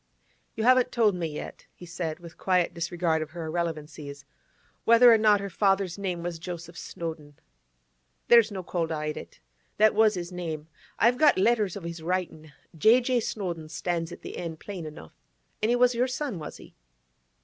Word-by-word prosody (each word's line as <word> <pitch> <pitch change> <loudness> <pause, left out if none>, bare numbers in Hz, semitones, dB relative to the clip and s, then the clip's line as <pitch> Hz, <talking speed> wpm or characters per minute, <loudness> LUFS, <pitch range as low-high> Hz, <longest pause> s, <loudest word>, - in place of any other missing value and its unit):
'You 220 - -2
haven't 255 +1 +4
told 225 -4 +3
me 175 -2 -2
yet,' 150 -1 -8
he 175 - -11
said, 170 -2 -4
with 170 -2 -12
quiet 180 -2 +1
disregard 170 -1 -1
of 155 - -4
her 165 0 -6
irrelevancies, 155 -3 -5 0.6
'whether 230 +1 +7
or - - +6
not 210 -1 +5
her 200 - -4
father's 195 -1 +1
name 180 -3 -3
was 170 -1 -4
Joseph 170 0 -7
Snowdon.' 160 -3 -7 0.9
'There's 235 -2 +6
no 190 -2 -5
call 170 -2 -2
to 160 - -3
hide 150 0 -3
it. - - -10 0.4
That 215 0 +5
was 215 -1 +4
his 175 0 -5
name. 160 -3 -5 0.3
I've 240 +3 +3
got 305 -1 +5
letters 210 -2 +2
of 200 - -7
his 170 -1 -6
writin'. 165 -3 -3 0.2
"J. 220 +10 +6
J. 250 0 +1
Snowdon" 175 -8 -4
stands 165 +1 -3
at - - -10
the - - -7
end, 165 -2 -5
plain 185 -6 -7
enough. 115 - -11 0.5
And 215 - +1
he 240 - +4
was 250 0 +4
your 245 +2 +1
son, 260 - -3
was 150 - -8
he? - - -15
175 Hz, 185 wpm, -27 LUFS, 165-215 Hz, 0.9 s, whether